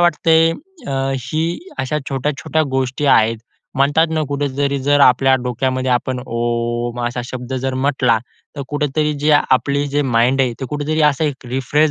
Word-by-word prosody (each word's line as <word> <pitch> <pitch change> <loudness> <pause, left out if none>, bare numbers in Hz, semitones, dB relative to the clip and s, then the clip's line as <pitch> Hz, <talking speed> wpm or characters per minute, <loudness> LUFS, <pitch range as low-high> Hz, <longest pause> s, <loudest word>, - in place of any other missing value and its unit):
वाटते 165 -1 +3 0.5
अ, - - -2 0.3
ही, 155 +6 -2 0.2
अशा 135 +3 -1
छोट्या-छोट्या 145 +3 -1
गोष्टी 135 +2 -1
आहेत. 115 -3 +4 0.4
म्हणतात 145 +4 +3
ना 160 -1 0
कुठेतरी 140 0 -1
जर 145 +1 +3
आपल्या 135 0 +5
डोक्यामध्ये 130 +1 -1
आपण 125 +1 -1
ओम 120 +1 -2
असा 120 +1 -3
शब्द 125 0 -7
जर 130 -1 -1
म्हटला. 130 -3 +2 0.4
तर 140 - -3
कुठेतरी 150 +1 0
जी 150 +1 +2
आपली 140 0 +2
जे 145 +1 0
माइंड 125 +1 +2
आहे 130 -2 +1
ते - - -3
कुठेतरी 150 +2 -1
असं 150 +3 -2
एक 135 -3 -4
रिफ्रेश 135 +5 +1
135 Hz, 155 wpm, -18 LUFS, 125-145 Hz, 0.5 s, आपल्या